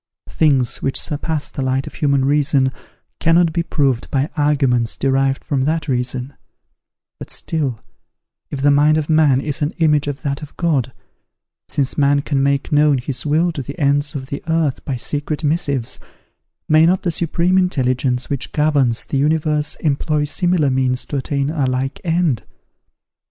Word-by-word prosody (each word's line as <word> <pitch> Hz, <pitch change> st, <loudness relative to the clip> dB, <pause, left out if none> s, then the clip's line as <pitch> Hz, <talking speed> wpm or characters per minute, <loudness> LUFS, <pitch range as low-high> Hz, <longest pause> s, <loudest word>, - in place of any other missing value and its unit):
Things 135 Hz, -6 st, +1 dB
which 135 Hz, -, 0 dB
surpass 150 Hz, 0 st, -3 dB
the -, -, -5 dB
light 130 Hz, +1 st, 0 dB
of -, -, -9 dB
human 140 Hz, -3 st, +1 dB
reason 140 Hz, -2 st, +2 dB, 0.5 s
cannot 165 Hz, 0 st, +3 dB
be 170 Hz, -, +1 dB
proved 135 Hz, -7 st, 0 dB
by 135 Hz, +2 st, -1 dB
arguments 135 Hz, -6 st, +1 dB
derived 135 Hz, 0 st, +1 dB
from 140 Hz, -4 st, 0 dB
that 160 Hz, 0 st, -1 dB
reason; 125 Hz, 0 st, -2 dB, 0.9 s
but -, -, -8 dB
still, 140 Hz, -8 st, -3 dB, 0.7 s
if 140 Hz, -, -5 dB
the 145 Hz, -, +5 dB
mind 150 Hz, +2 st, +4 dB
of 155 Hz, 0 st, -1 dB
man 150 Hz, -4 st, +4 dB
is 145 Hz, +2 st, -3 dB
an 145 Hz, +2 st, -1 dB
image 150 Hz, -3 st, +2 dB
of 145 Hz, -1 st, -5 dB
that 140 Hz, 0 st, -2 dB
of 150 Hz, -, -11 dB
God, 140 Hz, -8 st, 0 dB, 0.8 s
since 140 Hz, 0 st, -1 dB
man 140 Hz, 0 st, +3 dB
can 140 Hz, -3 st, 0 dB
make 140 Hz, 0 st, 0 dB
known 150 Hz, -1 st, +4 dB
his 130 Hz, +2 st, -3 dB
will 165 Hz, +4 st, +2 dB
to 155 Hz, -4 st, -5 dB
the 140 Hz, +2 st, -8 dB
ends 145 Hz, 0 st, +1 dB
of 130 Hz, -2 st, -4 dB
the 140 Hz, +2 st, -6 dB
earth 160 Hz, -4 st, 0 dB
by 135 Hz, -, -2 dB
secret 145 Hz, +5 st, -3 dB
missives, 145 Hz, -5 st, -1 dB, 0.7 s
may 155 Hz, +1 st, +5 dB
not 185 Hz, +2 st, +1 dB
the 175 Hz, -, 0 dB
Supreme 170 Hz, +3 st, +1 dB
Intelligence 130 Hz, -7 st, 0 dB
which 140 Hz, -3 st, -4 dB
governs 145 Hz, -6 st, +1 dB
the 140 Hz, -, -1 dB
universe 150 Hz, 0 st, 0 dB
employ 150 Hz, 0 st, 0 dB
similar 175 Hz, -2 st, +1 dB
means 130 Hz, -1 st, 0 dB
to 145 Hz, -, -3 dB
attain 140 Hz, +1 st, -1 dB
a 145 Hz, -5 st, 0 dB
like 130 Hz, +2 st, -2 dB
end? 165 Hz, -7 st, +1 dB
145 Hz, 165 wpm, -19 LUFS, 135-155 Hz, 0.9 s, the